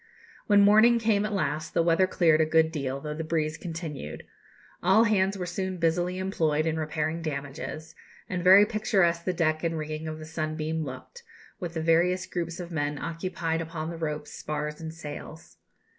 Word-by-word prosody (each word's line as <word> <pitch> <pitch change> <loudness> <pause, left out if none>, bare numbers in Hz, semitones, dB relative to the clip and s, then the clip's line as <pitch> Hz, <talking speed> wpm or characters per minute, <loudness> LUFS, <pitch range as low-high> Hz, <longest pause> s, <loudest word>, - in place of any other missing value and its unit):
When 205 -1 +6
morning 215 +4 +6
came 215 -3 +2
at 215 - -3
last 155 -6 -2
the 170 - +4
weather 170 +3 +3
cleared 160 -4 +3
a - - +4
good 160 0 +3
deal, 140 -4 -3
though 150 +1 -5
the 160 +2 -4
breeze 155 -1 -1
continued. 160 - -6 0.6
All 215 +4 +5
hands 200 -3 +2
were 180 - -3
soon 185 +1 -3
busily 175 +2 0
employed 160 -5 0
in 160 0 0
repairing 155 +1 -2
damages; 155 +1 -5 0.3
and 180 -1 -3
very 190 +3 +8
picturesque 190 -6 +1
the 185 - +1
deck 155 -2 0
and 165 -1 -1
rigging 155 0 -4
of 155 0 -4
the 155 - -9
Sunbeam 155 0 -3
looked, 135 - -9 0.4
with 170 -2 -5
the 160 - -2
various 175 +3 +3
groups 170 -1 -4
of 175 -1 -7
men 145 -2 -1
occupied 165 0 -3
upon 160 0 -5
the - - -6
ropes, 150 -2 -4
spars, 150 +1 -4
and 160 0 -5
sails. 160 0 -9
165 Hz, 180 wpm, -27 LUFS, 155-180 Hz, 0.6 s, very